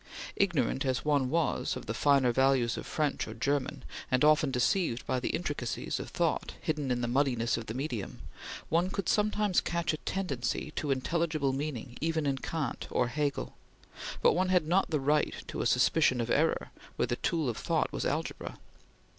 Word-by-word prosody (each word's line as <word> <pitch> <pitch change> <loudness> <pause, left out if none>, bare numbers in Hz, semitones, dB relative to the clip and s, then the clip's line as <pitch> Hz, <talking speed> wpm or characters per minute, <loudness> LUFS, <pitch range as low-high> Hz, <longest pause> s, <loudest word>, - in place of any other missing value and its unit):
Ignorant 150 -9 +1
as 130 0 -1
one 140 -4 +2
was 160 -2 0
of - - -7
the 115 - -3
finer 135 +1 +4
values 130 -2 +3
of - - -6
French 150 -2 -1
or 110 - -7
German, 140 +2 -1 0.3
and 130 +3 +3
often 155 -1 +5
deceived 125 +1 +1
by 130 - 0
the 125 - -2
intricacies 145 -8 -2
of - - -6
thought - - -1
hidden 150 -3 -2
in 120 -1 0
the 120 - 0
muddiness 120 -2 +1
of 115 -1 -5
the 110 - -5
medium, 125 -7 -4 0.5
one 170 +3 +2
could 195 -2 -3
sometimes 210 -2 +2
catch 170 -1 -1
a - - -2
tendency 150 -6 -2
to 150 - -2
intelligible 150 +1 0
meaning 135 -4 -4
even 160 -1 0
in 135 -1 0
Kant 150 -5 -3
or 120 - +1
Hegel; 145 +2 -2 0.7
but - - +6
one 185 +1 +1
had 180 -4 +3
not 180 +5 +2
the 155 - +1
right 150 +2 +1
to - - -4
a - - +1
suspicion 140 -6 +3
of 115 0 -1
error - - +1 0.2
where - - +1
the 120 - -2
tool 160 -4 0
of 120 - -2
thought - - 0
was - - -2
algebra. - - -3
140 Hz, 185 wpm, -30 LUFS, 125-160 Hz, 0.7 s, but